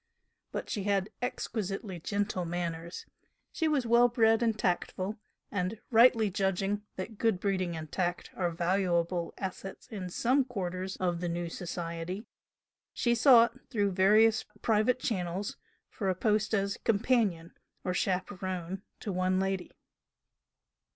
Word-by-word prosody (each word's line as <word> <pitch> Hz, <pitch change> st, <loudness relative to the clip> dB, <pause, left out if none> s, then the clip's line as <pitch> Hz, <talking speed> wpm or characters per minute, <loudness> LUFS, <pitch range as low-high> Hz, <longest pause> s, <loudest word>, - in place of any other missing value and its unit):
But -, -, -4 dB
she 200 Hz, -2 st, -3 dB
had 200 Hz, -1 st, +1 dB
exquisitely 200 Hz, -6 st, -3 dB
gentle 200 Hz, +1 st, -1 dB
manners, 170 Hz, 0 st, -4 dB, 0.5 s
she 325 Hz, -, 0 dB
was 290 Hz, -5 st, +1 dB
well 235 Hz, +1 st, +6 dB
bred 225 Hz, -1 st, +3 dB
and 225 Hz, -2 st, +1 dB
tactful, 185 Hz, +2 st, -1 dB, 0.3 s
and, 200 Hz, +2 st, -2 dB
rightly 225 Hz, -2 st, +6 dB
judging 195 Hz, +1 st, 0 dB
that 200 Hz, +3 st, -6 dB
good 225 Hz, -5 st, +2 dB
breeding 185 Hz, -3 st, -1 dB
and 155 Hz, -1 st, -7 dB
tact 175 Hz, -1 st, -2 dB
are 180 Hz, -2 st, 0 dB
valuable 175 Hz, 0 st, 0 dB
assets 190 Hz, 0 st, -6 dB
in 195 Hz, -6 st, -5 dB
some 255 Hz, +9 st, +2 dB
quarters 190 Hz, -6 st, -4 dB
of 175 Hz, -2 st, -1 dB
the 175 Hz, -, -1 dB
"new" 170 Hz, 0 st, -2 dB
society, 170 Hz, +3 st, -5 dB, 0.7 s
she 240 Hz, -, +2 dB
sought, 235 Hz, -1 st, +6 dB
through 205 Hz, -3 st, +1 dB
various 215 Hz, +4 st, +5 dB, 0.2 s
private 225 Hz, +3 st, +3 dB
channels, 190 Hz, -4 st, -2 dB, 0.3 s
for 195 Hz, -5 st, -2 dB
a 185 Hz, -, +1 dB
post 215 Hz, +3 st, +1 dB
as 200 Hz, -1 st, 0 dB
companion 205 Hz, -7 st, +1 dB, 0.3 s
or 180 Hz, -, -1 dB
"chaperone" 185 Hz, 0 st, -2 dB, 0.2 s
to 205 Hz, -, -3 dB
"one 185 Hz, +1 st, +1 dB
lady." 190 Hz, -1 st, -1 dB
195 Hz, 130 wpm, -30 LUFS, 180-220 Hz, 0.7 s, well